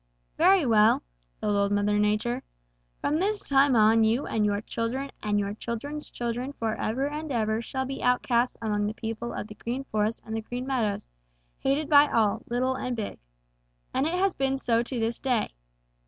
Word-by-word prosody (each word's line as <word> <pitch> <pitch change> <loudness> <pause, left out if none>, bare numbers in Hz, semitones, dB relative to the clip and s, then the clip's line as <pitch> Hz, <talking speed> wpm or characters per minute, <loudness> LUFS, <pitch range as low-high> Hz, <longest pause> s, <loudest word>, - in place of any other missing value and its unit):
'Very 365 -1 +5
well,' 220 -2 +4 0.4
said - - -5
Old 200 0 +2
Mother 205 0 +2
Nature, 215 +4 +1 0.6
'from 305 +2 0
this 410 +3 -1
time 275 -1 +4
on 220 0 +5
you 230 +5 +2
and 220 - 0
your 205 -1 +1
children 245 +5 -3
and 210 -1 +1
your 200 0 -2
children's 260 +7 -5
children 245 +3 -3
forever 225 +3 -1
and 300 +1 -5
ever 220 -2 0
shall 265 +2 -3
be 270 +1 -5
outcasts 250 0 +2
among 210 -1 0
the 215 - -4
people 225 +1 -4
of - - -4
the 210 - -10
Green 245 +5 -4
Forest 215 -3 -1
and 220 - -4
the 225 - -2
Green 245 +3 -5
Meadows, 235 -7 -1 0.5
hated 285 +3 0
by 290 -1 +7
all, 220 -3 +2
little 255 +2 +1
and 255 -1 -3
big.' 215 -3 -5 0.7
And 275 - +1
it 335 - -1
has 380 +1 +2
been 270 0 0
so 235 -3 +2
to 240 +1 -3
this 225 +1 -1
day. 250 -5 0
235 Hz, 185 wpm, -27 LUFS, 220-270 Hz, 0.7 s, by